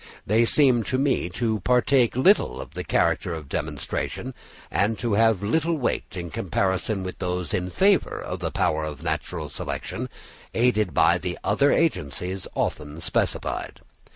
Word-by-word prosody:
They 110 +3 +3
seem 130 -2 +4
to 130 - 0
me 135 -9 +1
to 110 +3 -1
partake 125 +3 +3
little 130 - +3
of - - -8
the - - -4
character 85 - +1
of 75 -3 -8
demonstration, 75 - -3 0.4
and 105 +3 +1
to 115 -1 -1
have 110 -2 +3
little 160 +9 +1
weight 120 -7 -2
in 85 -2 -5
comparison 95 +3 -1
with 95 - -6
those 90 -3 -2
in 90 0 -1
favour 195 - +2
of - - -5
the - - -2
power 80 0 0
of 75 -2 -6
natural - - -2
selection, - - -4 0.5
aided 110 - +2
by - - +4
the - - -4
other 140 +1 +3
agencies 95 - -1
often 75 +1 -2
specified. 85 - -2
105 Hz, 155 wpm, -25 LUFS, 90-125 Hz, 0.5 s, seem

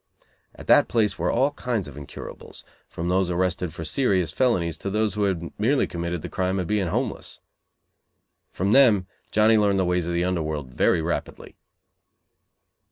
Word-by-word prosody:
At - - -11
that - - +5
place 110 -3 0
were - - 0
all 135 +4 +2
kinds 120 - -3
of 70 - -10
incurables, 75 -2 -9 0.3
from 85 - -5
those 90 0 +1
arrested 90 -1 -1
for 80 0 -7
serious 95 - +1
felonies 90 -11 +1
to 100 - -4
those 105 +1 0
who 105 -1 0
had 85 -4 -2
merely 130 +6 +2
committed 85 -1 -4
the - - -4
crime 95 0 -1
of 90 - -1
being 100 0 0
homeless. - - -3 1.1
From 95 +3 -1
them 110 -8 +5 0.2
Johnny 110 +1 +4
learned 100 -2 +2
the 95 - +1
ways 90 -1 0
of 85 - -2
the 85 - +1
under 90 -2 0
world 75 -5 -4
very 80 - +2
rapidly. 85 - -4
95 Hz, 170 wpm, -24 LUFS, 85-105 Hz, 1.1 s, that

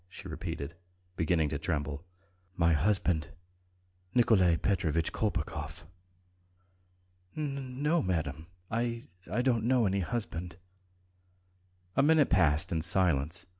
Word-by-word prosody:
she - - -10
repeated, 70 +4 -5 0.4
beginning 80 -1 +2
to 70 0 -3
tremble. 75 -2 -2 0.5
"My 85 -1 +4
husband,... 85 -1 +1 0.9
Nikolay 95 -8 +5
Petrovitch 85 -5 0
Kolpakov." 75 +1 -3 1.5
"N... 140 -3 -4
no, 165 +3 +3
madam.... 80 -4 -2 0.2
I... 115 +1 -2 0.2
I 120 +5 +1
don't 120 -4 +2
know 125 -2 +3
any 100 0 +1
husband." 90 -5 -3 1.4
A 135 - +4
minute 150 0 +4
passed 80 -5 +3
in 80 -2 0
silence. 85 -1 +2
90 Hz, 105 wpm, -30 LUFS, 80-115 Hz, 1.5 s, Nikolay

